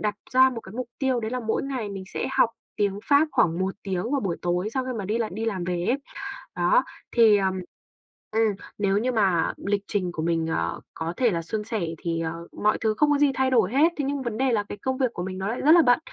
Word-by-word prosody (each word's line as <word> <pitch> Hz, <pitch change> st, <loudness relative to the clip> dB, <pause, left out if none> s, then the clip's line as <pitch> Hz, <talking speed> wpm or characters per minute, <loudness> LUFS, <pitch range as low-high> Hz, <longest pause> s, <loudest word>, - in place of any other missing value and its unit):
đặt 210 Hz, -1 st, 0 dB, 0.2 s
ra 260 Hz, +1 st, +6 dB
một 235 Hz, -3 st, -5 dB
cái 190 Hz, -, -12 dB
mục 245 Hz, +1 st, -4 dB
tiêu 260 Hz, -3 st, +1 dB
đấy 220 Hz, -, -3 dB
là 250 Hz, +1 st, -2 dB
mỗi 225 Hz, -1 st, -1 dB
ngày 260 Hz, -6 st, -3 dB
mình 195 Hz, -1 st, -6 dB
sẽ -, -, -3 dB
học 230 Hz, -, +4 dB, 0.3 s
tiếng 200 Hz, -2 st, 0 dB
Pháp 290 Hz, +3 st, +4 dB
khoảng 175 Hz, -10 st, +2 dB
1 190 Hz, +1 st, -1 dB
tiếng 195 Hz, +4 st, -2 dB
vào 280 Hz, -2 st, +1 dB
buổi 180 Hz, -4 st, -2 dB
tối 175 Hz, +3 st, 0 dB
sau 260 Hz, -, 0 dB
khi 255 Hz, -, -3 dB
mà 200 Hz, -, -3 dB
đi 215 Hz, +4 st, -1 dB
là 225 Hz, -2 st, 0 dB
đi 220 Hz, +4 st, -3 dB
làm 195 Hz, -6 st, -2 dB
về 175 Hz, -1 st, -2 dB
ấy. 255 Hz, -, +2 dB, 0.6 s
Đó, -, -, +3 dB, 0.3 s
thì, 225 Hz, -3 st, +6 dB
ờ, 195 Hz, -, +1 dB, 0.9 s
ừm, 220 Hz, -1 st, +2 dB, 0.2 s
nếu 200 Hz, -1 st, +2 dB
như 245 Hz, +5 st, +1 dB
mà 195 Hz, -8 st, +2 dB
lịch 200 Hz, 0 st, +1 dB
trình 185 Hz, -4 st, -1 dB
của 165 Hz, -, -4 dB
mình, 165 Hz, -1 st, 0 dB
ờ, 85 Hz, -, -1 dB
có 165 Hz, +1 st, -4 dB
thể 245 Hz, -4 st, +3 dB
là 170 Hz, -, -1 dB
suôn 210 Hz, +6 st, -3 dB
sẻ 220 Hz, -2 st, -3 dB, 0.2 s
thì, 165 Hz, +1 st, -2 dB
ờ 165 Hz, +1 st, -4 dB, 0.2 s
mọi 210 Hz, -, +4 dB
thứ 220 Hz, -1 st, +2 dB
không 295 Hz, +3 st, +4 dB
có 290 Hz, -, +4 dB
gì 285 Hz, -1 st, +4 dB
thay 265 Hz, 0 st, +1 dB
đổi 220 Hz, -6 st, +3 dB
hết, 315 Hz, +5 st, +4 dB
thế 290 Hz, -, -1 dB
nhưng 280 Hz, 0 st, -2 dB
vấn 235 Hz, -3 st, -3 dB
đề 265 Hz, 0 st, +2 dB
là 210 Hz, -3 st, +1 dB
cái 205 Hz, -, -8 dB
công 260 Hz, 0 st, -1 dB
việc 255 Hz, -3 st, 0 dB
của 175 Hz, -, -4 dB
mình 185 Hz, 0 st, -5 dB
nó 190 Hz, +1 st, -3 dB
lại 230 Hz, +4 st, -2 dB
rất 300 Hz, -, +5 dB
là 340 Hz, 0 st, +8 dB
bận. 245 Hz, -2 st, +4 dB
215 Hz, 270 wpm, -25 LUFS, 190-255 Hz, 0.9 s, là